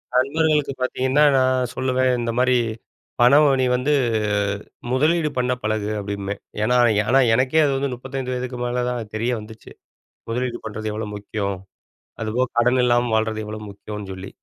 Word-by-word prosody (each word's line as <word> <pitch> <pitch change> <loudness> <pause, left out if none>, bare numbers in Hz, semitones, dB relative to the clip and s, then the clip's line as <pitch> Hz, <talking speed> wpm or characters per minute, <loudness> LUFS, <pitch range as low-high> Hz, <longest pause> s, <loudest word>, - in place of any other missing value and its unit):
நண்பர்களுக்கு 150 +2 +2
பார்த்தீங்கன்னா, 130 +3 +2
நான் 130 -1 +2
சொல்லுவேன் 130 0 +1
இந்த 115 -1 -1
மாரி 130 0 +3 0.7
"பணம் 145 +5 +6
நீ 130 - +3
வந்து 135 +4 +1 1.0
முதலீடு 155 +4 +2
பண்ண 125 0 +1
பழகு" 110 -1 -1
அப்படிம்பேன். 100 0 -4 0.2
ஏன்னா 125 +3 +3 0.3
ஆனா 135 0 +6
எனக்கே 130 +5 +3
அது 140 - +1
வந்து 135 -1 -1
35 130 0 -5
வயதுக்கு 125 0 -4
மேல 125 0 -1
தான் 115 -4 -4
தெரிய 115 +3 0
வந்துச்சு. 110 0 -13 0.6
முதலீடு 120 0 -2
பண்ணுறது 110 0 -4
எவ்வளோ 105 -1 -4
முக்கியம். 100 -1 -3 0.6
அதுபோக 120 +3 0
கடன் 125 +2 +3
இல்லாம 120 -1 +2
வாழ்றது 110 0 0
எவ்வளோ 105 0 -6
முக்கியம்னு 105 0 -8
சொல்லி. 95 +1 -8
125 Hz, 145 wpm, -22 LUFS, 110-130 Hz, 1.0 s, பணம்